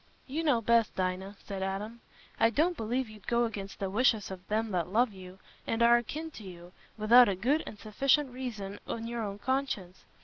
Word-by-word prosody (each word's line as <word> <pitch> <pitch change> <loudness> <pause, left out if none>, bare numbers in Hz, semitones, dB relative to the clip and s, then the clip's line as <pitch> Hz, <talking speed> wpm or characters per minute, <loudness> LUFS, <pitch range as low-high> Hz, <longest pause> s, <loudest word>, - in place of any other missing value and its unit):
"You 300 +5 -3
know 275 -7 +3
best, 230 0 +3
Dinah," 185 +2 -2
said 195 -2 -5
Adam. 205 +5 -4 0.4
"I 225 - +5
don't 320 +9 +1
believe 245 +2 -1
you'd 215 -2 -14
go 235 0 +2
against 200 -4 -6
the 195 - -2
wishes 215 0 +2
of 185 -1 -9
them 220 +1 -1
that 175 -3 0
love 225 +4 +2
you, 185 -1 -11 0.3
and 225 +1 +1
are 235 0 +7
akin 310 +7 -4
to 220 - -11
you, 175 -2 -11 0.3
without 230 +2 +7
a 195 - 0
good 260 - +1
and 210 - -8
sufficient 265 +6 +1
reason 220 -6 -6
in 230 0 -4
your 235 0 -3
own 200 -2 -4
conscience. 205 -8 -2
220 Hz, 200 wpm, -30 LUFS, 195-245 Hz, 0.4 s, are